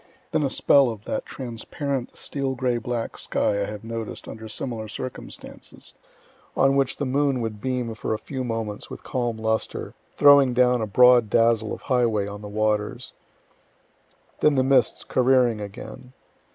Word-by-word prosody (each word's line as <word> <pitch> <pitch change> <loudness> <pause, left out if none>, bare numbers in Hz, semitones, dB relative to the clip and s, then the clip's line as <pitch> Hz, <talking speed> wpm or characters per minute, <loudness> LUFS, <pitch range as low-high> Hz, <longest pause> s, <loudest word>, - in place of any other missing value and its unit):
Then 155 - +1
a 140 - +1
spell 140 0 +4
of 110 -2 -7
that - - -3
transparent 130 +2 -5
steel 135 -2 -3
gray 125 -2 0
black 115 0 -4
sky 100 0 0
I - - 0
have 105 0 -7
noticed 115 -1 -6
under 110 0 -8
similar 110 0 -4
circumstances, 125 +3 -8 0.6
on 135 0 +4
which 135 -1 +1
the 145 - -2
moon 135 0 +1
would 110 -2 -4
beam 125 -3 -2
for 110 0 -2
a - - -3
few 130 +3 -5
moments 115 -3 -4
with - - -9
calm 120 -3 -2
lustre, 110 0 -2 0.2
throwing 140 -3 +6
down 125 -1 +3
a 110 - -1
broad 125 +1 +6
dazzle 115 0 +3
of - - -6
highway 115 -5 +1
on 100 0 -7
the 105 - -8
waters; 105 0 -1 1.3
then 150 -1 +4
the 130 - +3
mists 135 0 +2
careering 125 -3 +2
again. 125 +5 -9
120 Hz, 160 wpm, -24 LUFS, 110-130 Hz, 1.3 s, throwing